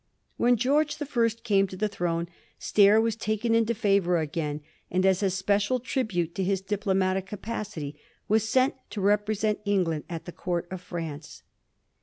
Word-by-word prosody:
When 245 Hz, +1 st, +3 dB
George 285 Hz, +6 st, +2 dB
the 295 Hz, -, -4 dB
First 230 Hz, -5 st, 0 dB
came 195 Hz, -4 st, +3 dB
to 185 Hz, -, -9 dB
the 215 Hz, +3 st, +1 dB
throne. 175 Hz, -4 st, -2 dB, 0.3 s
Stair 205 Hz, +1 st, +5 dB
was 225 Hz, -1 st, +1 dB
taken 220 Hz, +1 st, -1 dB
into 230 Hz, 0 st, +2 dB
favour 200 Hz, -5 st, +2 dB
again, 150 Hz, -1 st, -2 dB, 0.3 s
and 185 Hz, +1 st, +1 dB
as 190 Hz, 0 st, +3 dB
a 195 Hz, -, +2 dB
special 200 Hz, +6 st, +1 dB
tribute 215 Hz, -, -1 dB
to 190 Hz, -, -2 dB
his 190 Hz, +1 st, +1 dB
diplomatic 190 Hz, -1 st, 0 dB
capacity, 200 Hz, -9 st, -5 dB, 0.3 s
was 220 Hz, +1 st, +2 dB
sent 260 Hz, +3 st, +3 dB, 0.2 s
to 210 Hz, -, -5 dB
represent 210 Hz, +1 st, +1 dB
England 180 Hz, -7 st, 0 dB
at 165 Hz, -2 st, -6 dB
the 175 Hz, -, -6 dB
Court 175 Hz, 0 st, -3 dB
of 185 Hz, -1 st, -5 dB
France. 165 Hz, -4 st, -7 dB
200 Hz, 165 wpm, -27 LUFS, 180-220 Hz, 0.3 s, Stair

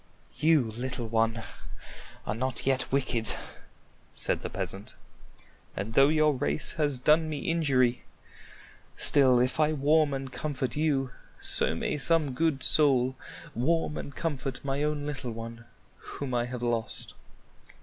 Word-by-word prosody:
"You, 155 Hz, -1 st, +5 dB
little 120 Hz, +1 st, -4 dB
one, 115 Hz, 0 st, +1 dB, 0.8 s
are -, -, -1 dB
not 125 Hz, +2 st, -3 dB
yet 130 Hz, -1 st, 0 dB
wicked," 130 Hz, -4 st, 0 dB, 0.8 s
said -, -, -1 dB
the -, -, -4 dB
peasant; 100 Hz, +2 st, -4 dB, 0.8 s
"and 100 Hz, +4 st, -3 dB
though 135 Hz, +3 st, +6 dB
your 155 Hz, 0 st, +3 dB
race 75 Hz, -, -1 dB
has 145 Hz, -4 st, 0 dB
done 155 Hz, +5 st, +3 dB
me 150 Hz, -2 st, -3 dB
injury, 135 Hz, -7 st, +2 dB, 0.9 s
still 130 Hz, -4 st, +4 dB
if 125 Hz, +5 st, +1 dB
I 155 Hz, 0 st, +3 dB
warm 150 Hz, +1 st, +3 dB
and 135 Hz, -1 st, -5 dB
comfort 130 Hz, -5 st, -3 dB
you, 140 Hz, -4 st, +1 dB, 0.3 s
so 80 Hz, -, +1 dB
may 150 Hz, -, -2 dB
some 155 Hz, -2 st, +2 dB
good 155 Hz, -1 st, 0 dB
soul 130 Hz, -4 st, +4 dB, 0.4 s
warm 150 Hz, +5 st, +1 dB
and 140 Hz, -, -6 dB
comfort 140 Hz, -5 st, -3 dB
my 135 Hz, +1 st, -1 dB
own 150 Hz, -1 st, -1 dB
little 135 Hz, -5 st, -4 dB
one 115 Hz, +1 st, -8 dB, 0.5 s
whom 135 Hz, -3 st, -4 dB
I 120 Hz, -1 st, +1 dB
have 120 Hz, 0 st, -5 dB
lost." 120 Hz, -2 st, -2 dB
135 Hz, 140 wpm, -28 LUFS, 120-150 Hz, 0.9 s, though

